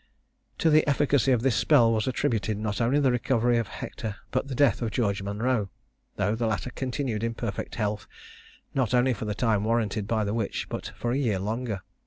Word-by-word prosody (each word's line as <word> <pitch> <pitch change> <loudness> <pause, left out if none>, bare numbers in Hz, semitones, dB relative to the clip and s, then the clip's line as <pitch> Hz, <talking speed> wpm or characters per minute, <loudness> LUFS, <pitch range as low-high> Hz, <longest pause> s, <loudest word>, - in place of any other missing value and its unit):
To 160 - +3
the 155 0 +6
efficacy 140 -2 +3
of 120 -2 +2
this 130 -4 +2
spell 115 0 +5
was 110 +1 0
attributed 110 -4 0
not 105 +1 -2
only 125 +5 +3
the 135 -3 +3
recovery 120 -1 +2
of 115 - -2
Hector, 110 -3 -6 0.2
but 130 +2 -1
the 135 - -4
death 135 -5 +3
of 115 - 0
George 100 -3 0
Monro, 105 +2 -1 0.5
though 105 +1 +1
the 115 0 -1
latter 110 +3 -2
continued 125 -3 -3
in 115 0 -1
perfect 110 -5 -4
health 105 -3 -2 0.7
not 130 -2 +1
only 125 +1 +3
for 110 0 -5
the 105 -1 -2
time 110 -4 +1
warranted 110 -2 0
by 110 -1 +1
the 100 0 -2
witch, 110 -3 -2
but - - -5
for 120 - -2
a 130 - +1
year 115 -8 +1
longer. 105 0 -3
115 Hz, 205 wpm, -27 LUFS, 105-125 Hz, 0.7 s, the